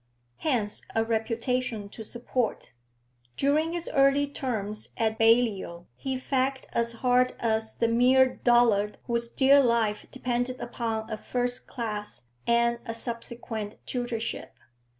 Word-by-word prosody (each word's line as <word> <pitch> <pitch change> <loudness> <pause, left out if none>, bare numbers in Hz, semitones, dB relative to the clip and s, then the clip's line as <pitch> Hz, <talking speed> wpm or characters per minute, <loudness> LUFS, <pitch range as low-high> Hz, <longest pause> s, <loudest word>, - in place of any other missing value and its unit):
Hence 235 -9 -1
a 225 0 +2
reputation 230 0 -1
to 220 - -9
support. 240 +1 -3 0.7
During 310 +4 +2
his 345 -1 -3
early 275 +1 +4
terms 220 -7 -4
at 220 -1 0
Balliol 225 -7 +2
he 265 - -3
fagged 265 +1 -1
as 235 0 0
hard 250 0 +4
as 220 -1 0
the 230 - +1
mere 255 +3 +4
dullard 230 -4 +3
whose 235 -1 -1
dear 275 +3 +5
life 230 -3 +1
depended 250 0 -2
upon 225 -2 -3
a 215 - -2
first 245 +1 -2
class 210 - -5 0.2
and 235 0 +3
a 230 - -5
subsequent 230 -2 -5
tutorship. 240 -2 -4
235 Hz, 125 wpm, -27 LUFS, 220-255 Hz, 0.7 s, dear